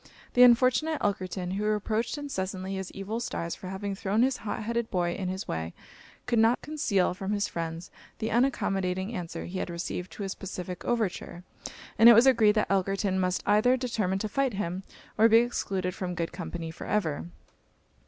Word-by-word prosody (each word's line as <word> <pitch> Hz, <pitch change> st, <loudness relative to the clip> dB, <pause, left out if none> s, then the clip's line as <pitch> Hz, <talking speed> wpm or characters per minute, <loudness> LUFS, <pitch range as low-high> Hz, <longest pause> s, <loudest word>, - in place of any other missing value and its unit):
The 250 Hz, -, +4 dB
unfortunate 255 Hz, +6 st, +5 dB
Elkerton, 185 Hz, -2 st, -2 dB
who 210 Hz, -, -2 dB
reproached 215 Hz, +4 st, 0 dB
incessantly 190 Hz, -9 st, -4 dB
his 190 Hz, -1 st, -4 dB
evil 200 Hz, +4 st, -4 dB
stars 170 Hz, -8 st, -3 dB
for 185 Hz, -, -8 dB
having 195 Hz, +1 st, -4 dB
thrown 200 Hz, +3 st, 0 dB
this 260 Hz, +1 st, +2 dB
hot 215 Hz, +1 st, -4 dB
headed 235 Hz, +1 st, -2 dB
boy 175 Hz, -2 st, 0 dB
in 185 Hz, 0 st, -3 dB
his 190 Hz, +1 st, -4 dB
way, 80 Hz, +1 st, -4 dB, 0.5 s
could 240 Hz, -2 st, +1 dB
not 225 Hz, +2 st, +4 dB
conceal 210 Hz, -13 st, +1 dB
from 195 Hz, +2 st, -3 dB
his 205 Hz, -1 st, 0 dB
friends 165 Hz, +1 st, -5 dB, 0.3 s
the 220 Hz, -, -3 dB
unaccommodating 195 Hz, -5 st, 0 dB
answer 175 Hz, -6 st, -5 dB
he 185 Hz, +2 st, -5 dB
had -, -, -3 dB
received 175 Hz, +1 st, -4 dB
to 205 Hz, -, -6 dB
his 195 Hz, 0 st, -3 dB
pacific 180 Hz, -2 st, -6 dB
overture; 205 Hz, -6 st, -2 dB, 0.6 s
and 230 Hz, +1 st, +10 dB
it -, -, +10 dB
was 230 Hz, +3 st, +7 dB
agreed 225 Hz, -5 st, +5 dB
that 215 Hz, -, +1 dB
Elkerton 195 Hz, 0 st, +1 dB
must 185 Hz, 0 st, 0 dB
either 215 Hz, +5 st, +4 dB
determine 220 Hz, -7 st, -1 dB
to 215 Hz, -, -2 dB
fight 265 Hz, 0 st, 0 dB
him, 185 Hz, -1 st, -3 dB, 0.4 s
or 225 Hz, +1 st, +7 dB
be 225 Hz, -, +7 dB
excluded 195 Hz, -6 st, 0 dB
from 180 Hz, -1 st, -4 dB
good 170 Hz, -1 st, -2 dB
company 165 Hz, -1 st, -5 dB
for 160 Hz, -, -9 dB
ever. 85 Hz, -, -1 dB
195 Hz, 185 wpm, -28 LUFS, 185-230 Hz, 0.6 s, and